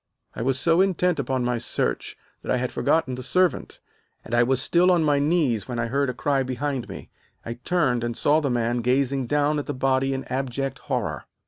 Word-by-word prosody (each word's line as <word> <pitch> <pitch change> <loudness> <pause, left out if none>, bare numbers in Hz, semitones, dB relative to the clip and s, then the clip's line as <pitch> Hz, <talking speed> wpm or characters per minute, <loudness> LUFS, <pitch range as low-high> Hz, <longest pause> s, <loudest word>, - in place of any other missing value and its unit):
"I - - -5
was 130 +2 +1
so 170 +4 +3
intent 180 -3 +1
upon 130 -1 -1
my 120 -1 0
search - - -2 0.2
that - - -4
I - - +2
had 125 0 -2
forgotten 160 -5 +1
the 125 - -5
servant, 180 +5 0 0.4
and - - -8
I 120 - +4
was 130 +1 +2
still 175 +6 +3
on 175 -3 +3
my 145 -2 +2
knees 145 - +1
when 120 - -4
I 115 - 0
heard 140 +2 0
a - - -2
cry 140 0 +1
behind 130 0 -3
me. - - -9 0.3
I 115 - -4
turned, 135 -10 +1
and 120 -1 -3
saw 150 +2 +3
the 145 -3 -1
man 120 -1 0
gazing 130 +1 +1
down 145 +2 +1
at 145 - -6
the 145 - -3
body 135 +1 +1
in 135 - -4
abject 135 +1 -3
horror. 105 - -3
135 Hz, 215 wpm, -24 LUFS, 125-145 Hz, 0.4 s, I